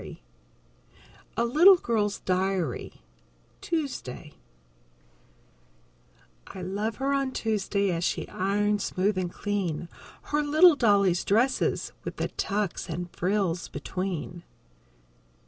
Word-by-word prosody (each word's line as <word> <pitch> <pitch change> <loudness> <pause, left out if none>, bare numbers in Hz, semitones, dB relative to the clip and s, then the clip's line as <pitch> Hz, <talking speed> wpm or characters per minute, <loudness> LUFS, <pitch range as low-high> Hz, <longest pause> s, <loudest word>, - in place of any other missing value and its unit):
_ - - -9 1.2
A 235 - +2
LITTLE 345 +10 +7
GIRL'S 215 - -1
DIARY 185 -6 -2 0.6
Tuesday 255 - -4 2.1
_I 185 -2 -7
love 210 +3 -2
her 275 +1 -1
on 275 -1 0
Tuesday 200 -3 0
As 170 0 -2
she - - -1
irons 205 +2 0
smooth 195 +3 0
and 180 -2 -2
clean 180 -6 -3 0.3
Her 295 0 0
little 310 +3 +6
dolly's 200 -8 +3
dresses 235 +6 +1
With - - -5
the - - -2
tucks 200 -4 -2
and 175 +2 -5
frills 180 -2 0
between. 180 -2 -5
200 Hz, 105 wpm, -27 LUFS, 180-235 Hz, 2.1 s, LITTLE